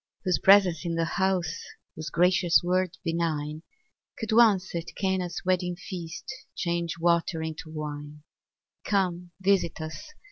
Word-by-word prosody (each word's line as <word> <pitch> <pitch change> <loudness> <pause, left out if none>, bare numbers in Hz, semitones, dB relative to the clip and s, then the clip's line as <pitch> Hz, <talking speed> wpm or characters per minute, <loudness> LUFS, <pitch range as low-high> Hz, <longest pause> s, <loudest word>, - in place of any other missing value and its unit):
whose 185 -2 +1
presence 190 -4 +5
in 170 -1 -2
the 165 0 +1
house, 180 -1 0 0.3
Whose 155 -2 -5
gracious 180 +2 +4
word 185 0 0
benign, 155 -2 -2 0.6
Could 225 -1 -4
once, 215 -5 +4
at 170 -1 -5
Cana's 190 -3 -1
wedding 180 -1 +1
feast, 175 -2 -7 0.3
Change 170 -2 -2
water 170 -1 +1
into 160 0 -6
wine; 150 -1 -6 0.6
Come, 180 -3 0
visit 190 -4 +1
us! 160 - -7
175 Hz, 130 wpm, -27 LUFS, 160-185 Hz, 0.6 s, presence